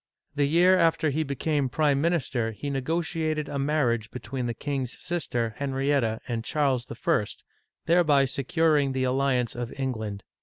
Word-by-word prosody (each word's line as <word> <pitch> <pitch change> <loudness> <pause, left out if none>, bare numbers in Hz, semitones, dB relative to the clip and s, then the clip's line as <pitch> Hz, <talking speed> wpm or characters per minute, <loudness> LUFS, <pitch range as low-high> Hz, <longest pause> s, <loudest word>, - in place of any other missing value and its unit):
The 145 -1 +1
year 180 +4 +5
after 165 -2 +2
he 155 +3 0
became 140 -1 -1
prime 145 0 +2
minister 135 -9 0
he 140 +7 -5
negotiated 155 +2 -1
a 140 - -3
.marriage 130 -6 +1
be 125 - -7
tween 130 -2 -4
the 120 - -3
king's 135 -1 -3
sister 125 -10 -2
Henrietta 135 -4 0
and 115 -2 -2
Charles 135 -2 0
I., - - -6
tliereby 145 +7 0
securing 145 +1 +1
the 130 0 0
alliance 130 -2 +1
of 120 -1 -4
England. 110 -7 -3
140 Hz, 150 wpm, -26 LUFS, 125-155 Hz, -, year